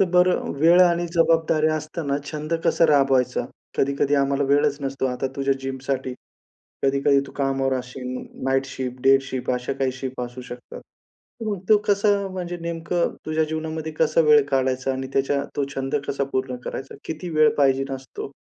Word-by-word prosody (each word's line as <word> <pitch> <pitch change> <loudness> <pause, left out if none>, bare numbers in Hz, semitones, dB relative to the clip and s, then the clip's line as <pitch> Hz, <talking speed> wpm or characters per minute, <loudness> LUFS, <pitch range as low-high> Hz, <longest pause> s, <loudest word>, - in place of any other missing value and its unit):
तर 195 - +6
बरं 180 0 +3
वेळ 170 +4 +6
आणि 175 -1 +2
जबाबदाऱ्या 160 -2 +3
असताना 155 -2 -3
छंद 155 +1 -5
कसा 165 - +4
राबवायचा? 135 -4 +3 0.3
कधी-कधी 140 +1 +1
आम्हाला 140 0 +2
वेळच 145 0 +3
नसतो, 135 -1 -2
आता 125 +1 -2
तुझ्या 135 0 +1
जिमसाठी. 130 -1 -3 0.7
कधी 135 0 +2
कधी 140 -1 +5
तू - - -12
कामावर 135 -1 0
असशील 125 0 -6 0.3
नाईट 135 0 +2
शिफ्ट, 130 -1 -5
डे 135 0 +6
शिफ्ट 130 -1 -4
अशा 125 +1 -1
काही 135 -1 -1
शिफ्ट 130 -1 -6
असू 125 +1 -6
शकतात. 125 0 -9 0.6
तू 215 -2 -1
मग - - -8
तो 215 - +7
कसा 205 +1 +3 0.2
म्हणजे 175 -1 -4
नेमकं 170 +1 -1
तुझ्या 155 0 +1
जीवनामध्ये 160 0 -4
कसा 160 +1 +2
वेळ 150 -1 +7
काढायचा 130 0 +1
आणि 130 0 -4
त्याच्या 140 +1 +1
तो 145 - +1
छंद 135 +1 -3
कसा 140 0 0
पूर्ण 130 -1 -1
करायचा? 135 - -6
किती 175 +2 -5
वेळ 155 -1 +5
पाहिजेल 135 -1 +2
असतो? 135 +1 -8
140 Hz, 170 wpm, -23 LUFS, 135-160 Hz, 0.7 s, तो